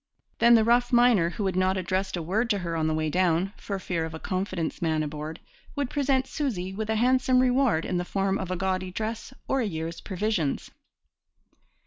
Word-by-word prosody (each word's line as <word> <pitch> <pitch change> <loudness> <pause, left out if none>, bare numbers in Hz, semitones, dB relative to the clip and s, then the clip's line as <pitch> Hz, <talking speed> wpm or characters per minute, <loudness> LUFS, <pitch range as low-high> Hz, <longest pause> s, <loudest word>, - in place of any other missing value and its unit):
Then 235 +1 +7
the 225 - +5
rough 240 +2 +3
miner, 240 -8 +5
who 200 +3 -4
had 190 -2 -1
not 185 +1 +2
addressed 185 0 -1
a 170 - -3
word 215 +8 0
to 205 - +2
her 170 -3 -3
on 160 -1 0
the 155 - +1
way 155 0 0
down, 180 +3 +1
for 200 - -4
fear 175 -3 -2
of 160 0 -5
a - - -7
confidence 185 -2 -3
man 160 -2 +1
aboard, 150 +2 -6 0.4
would 285 -3 -2
present 270 -2 +1
'Susy' 205 - -3
with 215 +2 -4
a 220 - +1
handsome 255 +2 +3
reward 250 -9 +2
in 180 - -1
the 175 - 0
form 195 +2 -1
of 190 - -4
a 185 - -1
gaudy 185 0 -1
dress 220 +5 -4 0.2
or 270 - +1
a - - 0
year's 165 -3 -4
provisions. 190 -6 -2
190 Hz, 205 wpm, -26 LUFS, 170-230 Hz, 0.4 s, Then